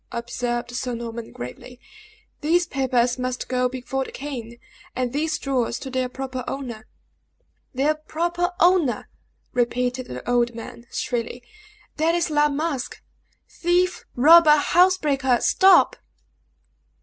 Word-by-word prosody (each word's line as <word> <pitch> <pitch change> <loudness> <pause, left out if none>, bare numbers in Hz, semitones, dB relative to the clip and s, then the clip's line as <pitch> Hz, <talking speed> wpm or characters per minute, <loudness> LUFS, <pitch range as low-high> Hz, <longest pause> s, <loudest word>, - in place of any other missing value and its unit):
observed 240 0 -3
Sir 250 0 -3
Norman, 230 -1 -6
gravely. 185 - -9 0.6
"These 340 +4 +2
papers 255 -5 0
must 250 0 -3
go 250 0 +1
before 260 +1 -3
the - - -9
king, 240 -5 -7 0.4
and 250 -1 -2
these 310 +2 0
jewels 255 -4 -1
to 265 - -7
their 255 -1 -1
proper 260 0 -5
owner." 240 -5 -6 0.9
"Their 285 +4 +2
proper 345 +3 -2
owner!" 345 -7 +3 0.4
repeated 250 +1 -1
the 125 +7 -8
old 240 -1 +1
man, 235 +1 -9
shrilly; 240 0 -3 0.5
"that 325 +2 +2
is 345 -2 0
La 295 0 +3
Masque. 290 -2 -3 0.5
Thief 355 +1 0
robber 310 +3 +8
housebreaker 295 -6 +3
stop!" 380 -2 +5
260 Hz, 120 wpm, -23 LUFS, 245-310 Hz, 0.9 s, robber